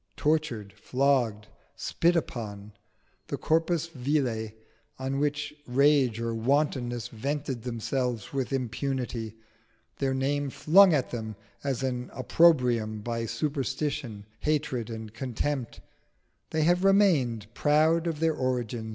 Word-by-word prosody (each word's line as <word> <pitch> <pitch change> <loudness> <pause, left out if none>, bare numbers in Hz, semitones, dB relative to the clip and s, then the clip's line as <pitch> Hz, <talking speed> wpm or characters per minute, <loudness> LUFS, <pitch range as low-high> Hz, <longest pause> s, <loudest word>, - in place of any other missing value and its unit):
Tortured, 145 -10 0
flogged, 125 -6 +1 0.3
spit 170 +1 +1
upon, 105 -9 -4 0.5
the - - -3
corpus 165 0 +1
vile 130 -7 -1 0.5
on 135 +1 -2
which 150 0 -1
rage 135 -2 +3
or 115 0 -2
wantonness 120 -1 0
vented 135 +1 -3
themselves 120 0 -2
with 135 -1 -2
impunity, 125 -3 -2 0.6
their 135 -1 0
name 140 +1 0
flung 165 +8 +6
at 145 -5 +1
them 110 -3 -5 0.3
as 135 -2 -1
an 125 -1 -2
opprobrium 125 -7 +3
by 115 +1 -3
superstition, 130 -3 -2
hatred, 145 -7 -1
and 110 -2 -7
contempt, 130 +1 -3 0.7
they 155 -1 +1
have 175 +3 +3
remained 165 - +3
proud 160 +4 +3
of 160 -3 -2
their 160 0 +2
origin. 120 -4 -2
130 Hz, 115 wpm, -28 LUFS, 115-150 Hz, 0.7 s, flung